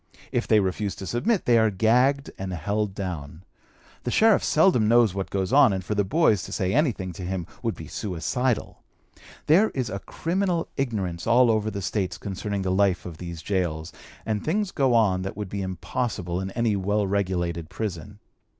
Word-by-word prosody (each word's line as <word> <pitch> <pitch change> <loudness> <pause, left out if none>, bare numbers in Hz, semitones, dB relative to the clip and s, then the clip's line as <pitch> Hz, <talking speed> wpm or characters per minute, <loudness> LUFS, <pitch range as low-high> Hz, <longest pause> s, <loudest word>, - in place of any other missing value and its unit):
If 120 - -1
they 110 - +5
refuse 100 +1 -1
to 95 - -7
submit, 180 - 0
they 120 -1 +5
are 110 0 +4
gagged 125 +7 +2
and 95 -1 -4
held 100 +4 -2
down. 85 -4 -6 0.6
The - - -3
sheriff 220 - +4
seldom 155 - +4
knows 115 -3 +4
what 95 -1 -3
goes 95 +3 -2
on, 140 -5 +7
and 95 -2 -3
for 105 - -1
the 105 -1 +2
boys 110 - +3
to - - -8
say 95 0 -1
anything 115 - 0
to 90 - -9
him 90 -1 -3 0.2
would - - -1
be - - -9
suicidal. 115 +6 -2 0.6
There 190 +8 +5
is 125 -5 -2
a 100 - -3
criminal 175 - -1
ignorance 100 -10 -2
all 120 0 +5
over 110 -1 0
the 100 -2 -5
States 95 0 -2
concerning 100 0 -4
the 95 - 0
life 95 -1 +2
of 85 -3 -8
these 85 -2 -7
gaols, 85 -5 -2 0.3
and 110 -2 -2
things 200 +4 0
go 135 -4 +2
on 100 -5 +3
that 95 0 -5
would 105 -3 -4
be 100 +1 -4
impossible 95 -1 -3
in 95 - -4
any 115 +1 0
well 100 +2 0
regulated 90 -4 -1
prison. 100 0 -5
100 Hz, 185 wpm, -25 LUFS, 95-120 Hz, 0.6 s, on